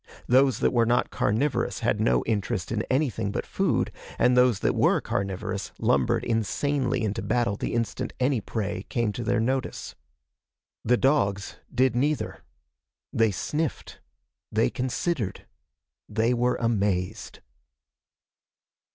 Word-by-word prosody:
Those 130 +1 +4
that - - +2
were 115 -2 +3
not 120 - +2
carnivorous 120 +8 0
had - - +1
no 60 0 +3
interest 100 -4 -1
in 110 -2 0
anything 130 -6 0
but - - -3
food, - - 0 0.3
and 125 0 +4
those 125 -4 +4
that - - +2
were - - +3
carnivorous 100 -2 -3
lumbered 65 -3 +2
insanely 125 +3 0
into 105 -1 -1
battle 120 -5 0
the 105 - -3
instant 115 -3 -2
any 130 -2 +2
prey 100 -3 -3
came 115 -3 0
to 120 +4 -5
their 120 +1 +1
notice. 130 +3 -2 0.9
The 125 +2 +3
dogs 100 -9 +1
did 130 -1 +2
neither. 145 +4 -1 0.7
They 115 -1 +3
sniffed. 150 - -3 0.5
They - - +2
considered. 130 - -2 0.6
They 110 +3 +1
were 125 +1 +1
amazed. 105 -3 -1
115 Hz, 125 wpm, -26 LUFS, 105-125 Hz, 0.9 s, Those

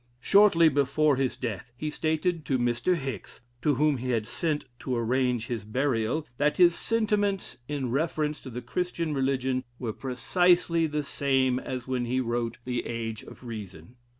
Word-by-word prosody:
Shortly 195 0 +6
before 145 0 +3
his 130 -1 -1
death, 115 -1 -5
he 155 +3 -3
stated 160 +2 0
to 135 -1 +1
Mr. 120 +8 +1
Hicks, 135 -5 -6 0.2
to 145 +3 +2
whom 150 0 +2
he 125 +1 -4
had 115 -3 +1
sent 150 +5 -2
to 130 - -2
arrange 125 0 +1
his 120 -5 -4
burial? 125 +4 0
that 150 +1 +2
his 175 -2 +6
sentiments 205 - 0
in 140 -5 -2
reference 150 +1 -1
to 130 - -8
the 125 0 -6
Christian 170 +3 -2
religion 130 -1 0
were 115 -4 -3
precisely 170 - +2
the 150 -1 -2
same 135 -2 +1
as 130 -1 -5
when 125 -2 -1
he 125 +2 0
wrote 120 -1 -1
the 125 -1 -1
"Age 115 -2 -4
of - - -13
Reason." 105 -4 -8
130 Hz, 165 wpm, -28 LUFS, 120-155 Hz, 0.2 s, Shortly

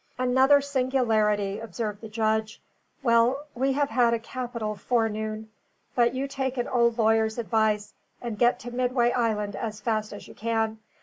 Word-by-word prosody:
"Another 260 +3 +4
singularity," 225 -7 +1
observed 215 -1 -5
the 220 - -8
judge. 220 0 -1 0.4
"Well, 240 +4 +3
we 265 +2 0
have 285 +1 0
had 235 -2 +3
a - - -3
capital 235 -2 -4
forenoon. 220 0 -2 0.4
But 240 0 +2
you 270 +2 -2
take 265 -1 -3
an 245 - -1
old 235 -2 +2
lawyer's 220 0 +2
advice, 220 -2 0 0.3
and 230 -4 -5
get 240 0 +4
to 245 - -7
Midway 245 -1 +1
Island 215 -4 -1
as 215 -2 -4
fast 215 0 -1
as 205 - -9
you - - -12
can. 225 -1 -1
230 Hz, 160 wpm, -26 LUFS, 215-250 Hz, 0.4 s, Another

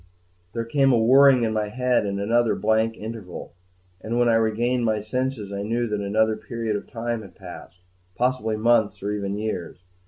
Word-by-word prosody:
II 90 - -27 0.5
There 115 -1 -3
came 135 +3 +3
a 120 - +4
whirring 130 +2 +6
in 110 -1 0
my 105 -1 -1
head, 125 0 0
and 100 0 -3
another 115 +3 +2
blank 110 +1 +1
interval; 110 -6 -8 0.5
and 115 +4 -3
when 120 0 +3
I - - +4
regained 115 +2 +1
my 110 -2 +1
senses 110 -1 -3
I 100 - -3
knew 115 +4 -1
that 105 -2 -2
another 110 +2 +1
period 115 -1 -4
of 100 - -5
time 115 0 -3
had 100 -4 -13
passed, 90 +1 -12 0.3
possibly 125 -3 0
months 110 -2 +2
or 100 - -1
even 100 -1 -3
years. 95 -4 -5
110 Hz, 190 wpm, -24 LUFS, 105-120 Hz, 0.5 s, whirring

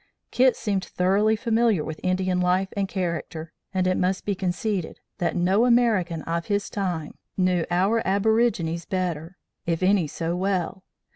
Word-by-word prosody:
"Kit 255 -1 +4
seemed 200 -4 -1
thoroughly 200 +5 +2
familiar 225 -5 +2
with 160 0 -6
Indian 185 0 0
life 180 +2 +1
and 200 -1 0
character, 170 -3 -4 0.2
and 185 -2 0
it 185 0 +2
must 185 +1 0
be 205 - 0
conceded, 185 0 -2 0.2
that 175 - 0
no 185 +5 +3
American 210 -9 +2
of 170 0 -3
his 205 -1 -1
time 180 -6 -3 0.2
knew 180 -2 +1
our 195 +6 +2
aborigines 200 -4 +1
better 180 -2 -3 0.3
if 170 +1 0
any 185 -3 +3
so 165 +3 -3
well. 185 0 -1
185 Hz, 150 wpm, -25 LUFS, 175-205 Hz, 0.3 s, Kit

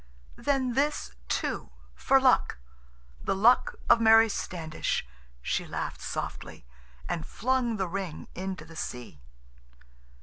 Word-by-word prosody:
"Then 265 -3 0
this, 280 - 0 0.2
too, - - -2 0.2
for 65 +2 +3
luck—the 60 - -1
luck 225 +6 +4
of 235 -1 +6
Mary 225 0 +7
Standish," 160 - -3 0.4
she - - -1
laughed - - -4
softly, - - -5 0.4
and 165 -2 -2
flung 245 +1 0
the 190 -2 -1
ring 185 -3 -5
into 185 -3 -5
the 165 0 -13
sea. 125 - -6
190 Hz, 110 wpm, -28 LUFS, -, 0.4 s, Mary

